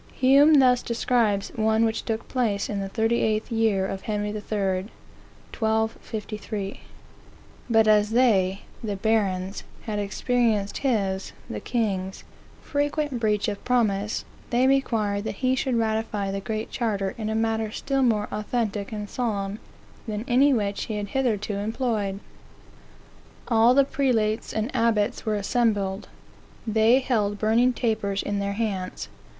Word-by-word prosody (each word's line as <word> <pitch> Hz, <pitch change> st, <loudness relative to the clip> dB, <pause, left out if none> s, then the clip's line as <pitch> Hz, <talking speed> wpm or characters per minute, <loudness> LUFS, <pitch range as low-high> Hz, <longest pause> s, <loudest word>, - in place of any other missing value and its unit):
Hume 280 Hz, +4 st, +6 dB
thus 255 Hz, -3 st, +5 dB
describes 230 Hz, -4 st, +1 dB
one 220 Hz, 0 st, +2 dB
which 225 Hz, 0 st, -2 dB
took 225 Hz, -1 st, -3 dB
place 220 Hz, -7 st, -1 dB
in 205 Hz, -, -2 dB
the 195 Hz, 0 st, -3 dB
38th 220 Hz, +1 st, 0 dB
year 220 Hz, -4 st, +2 dB
of 190 Hz, 0 st, -4 dB
Henry 210 Hz, -1 st, -2 dB
III. 210 Hz, 0 st, -5 dB, 1.1 s
(1253): 220 Hz, -2 st, -3 dB, 0.5 s
" -, -, -25 dB
But 225 Hz, -1 st, +4 dB
as 210 Hz, -1 st, +4 dB
they 205 Hz, -5 st, +2 dB, 0.2 s
(the 210 Hz, -2 st, -2 dB
barons) 195 Hz, -2 st, 0 dB, 0.2 s
had 215 Hz, -3 st, -3 dB
experienced 210 Hz, 0 st, 0 dB
his 200 Hz, -8 st, -1 dB
(the -, -, -5 dB
king's) 195 Hz, -5 st, -2 dB, 0.4 s
frequent 290 Hz, -2 st, -1 dB
breach 210 Hz, -2 st, +1 dB
of 205 Hz, -2 st, -4 dB
promise, 210 Hz, -4 st, 0 dB, 0.2 s
they 245 Hz, +2 st, +3 dB
required 225 Hz, -7 st, +1 dB
that -, -, -3 dB
he 255 Hz, -, +4 dB
should 260 Hz, -1 st, 0 dB
ratify 220 Hz, -3 st, -1 dB
the 195 Hz, -, -2 dB
Great 215 Hz, +2 st, -4 dB
Charter 205 Hz, -5 st, -1 dB
in 215 Hz, -1 st, -4 dB
a 220 Hz, -, -1 dB
manner 225 Hz, -1 st, 0 dB
still 275 Hz, +5 st, -1 dB
more 220 Hz, -5 st, +2 dB
authentic 210 Hz, -1 st, -2 dB
and 210 Hz, -1 st, -4 dB
solemn 205 Hz, -4 st, -2 dB, 0.5 s
than 215 Hz, +1 st, -3 dB
any 270 Hz, +4 st, +5 dB
which 205 Hz, -5 st, 0 dB
he 215 Hz, -, -4 dB
had 205 Hz, -1 st, -4 dB
hitherto 215 Hz, -6 st, -1 dB
employed. 210 Hz, -2 st, -1 dB, 1.3 s
All 230 Hz, +1 st, +5 dB
the 275 Hz, 0 st, +5 dB
prelates 230 Hz, -6 st, 0 dB
and 220 Hz, +4 st, -3 dB
abbots 225 Hz, -2 st, +1 dB
were 215 Hz, -, +1 dB
assembled. 205 Hz, -2 st, 0 dB, 0.6 s
They 220 Hz, +2 st, +4 dB
held 210 Hz, -6 st, 0 dB
burning 230 Hz, +4 st, +3 dB
tapers 215 Hz, -5 st, -1 dB
in 205 Hz, 0 st, -2 dB
their 200 Hz, 0 st, -1 dB
hands. 200 Hz, -4 st, -3 dB
220 Hz, 140 wpm, -25 LUFS, 205-235 Hz, 1.3 s, Hume